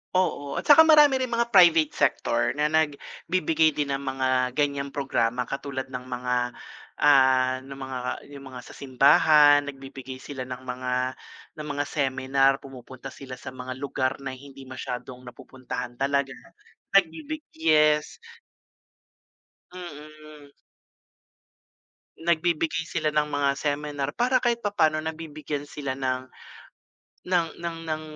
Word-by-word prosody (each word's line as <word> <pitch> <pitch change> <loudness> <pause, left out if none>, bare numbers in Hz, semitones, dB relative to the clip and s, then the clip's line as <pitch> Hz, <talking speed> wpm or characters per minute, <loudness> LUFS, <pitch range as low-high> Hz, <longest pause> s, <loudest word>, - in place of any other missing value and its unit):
Oo 145 -6 0
at - - -3
saka 320 +2 +7
marami 295 -4 +6
rin 255 - -1
mga 235 0 -1
private 170 -6 +6
sector 120 -3 0
na 150 +1 0
nagbibigay 160 +1 0
din 145 -2 -1
ng 135 - -1
mga 130 -2 -1
ganyang 140 -1 0
programa 125 -4 -1
katulad 140 +1 -5
ng 125 0 -6
mga 125 0 -2 0.6
ah, 130 -2 +4
ng 135 +1 -10
mga, 130 -1 -6 0.3
yung 140 -1 -10
mga 130 -1 -9
sa - - -13
simbahan 145 +2 +5
nagbibigay 135 -1 -8
sila 130 -1 -7
ng 130 0 -7
mga 125 0 -4 0.7
ng 150 - -6
mga 145 0 -2
seminar, 135 -1 +1
pumupunta 130 0 -10
sila 130 -2 -9
sa 130 +1 -9
mga 130 0 -7
lugar 135 -1 -2
na 135 - -4
hindi 135 +1 -12
masyadong 125 -1 -7
napupuntahan 125 0 -7
talaga 140 0 0 0.6
nagbibig 285 - +1
yes. 155 -1 +2 1.6
Mm. 155 -3 -11 1.7
Nagbibigay 165 -1 0
sila 155 -2 -1
ng 150 0 +1
mga 145 -1 +1
seminar 145 0 -2
para 250 +1 +2
kahit 240 -1 +1
papaano 160 -7 +2
nabibigyan 155 -2 -5
sila 140 -3 -4
ng 130 -1 -2 1.0
ng 180 -2 +1 0.2
ng 170 -1 -4
ng 155 0 -3
140 Hz, 125 wpm, -25 LUFS, 130-155 Hz, 1.7 s, saka